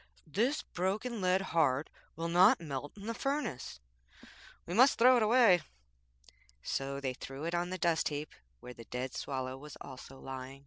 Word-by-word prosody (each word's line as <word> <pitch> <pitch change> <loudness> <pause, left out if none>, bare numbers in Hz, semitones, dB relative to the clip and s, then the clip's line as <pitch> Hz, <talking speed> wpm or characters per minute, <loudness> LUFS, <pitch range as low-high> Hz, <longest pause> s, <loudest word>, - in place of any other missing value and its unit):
'This 235 - 0
broken 205 +5 -2
lead 185 +1 +3
heart 150 -3 +2 0.3
will 165 +1 -3
not 180 +4 +6
melt 145 -3 -5
in 200 - -9
the 230 - -2
furnace. 275 - -3 0.9
We 175 - -5
must 255 +7 +6
throw 250 +2 +7
it - - +2
away.' 215 -5 +5 1.0
So 140 0 -2
they 135 -2 -2
threw 135 +3 -8
it 170 +1 -2
on 175 +1 -1
a 185 - -2
dust 170 -2 +1
heap 150 0 -5 0.3
where 125 - -9
the 115 -1 -12
dead 125 +3 -4
Swallow 130 -1 -4
was 150 +1 -10
also 135 0 -10
lying. 135 0 -7
165 Hz, 170 wpm, -32 LUFS, 135-200 Hz, 1.0 s, throw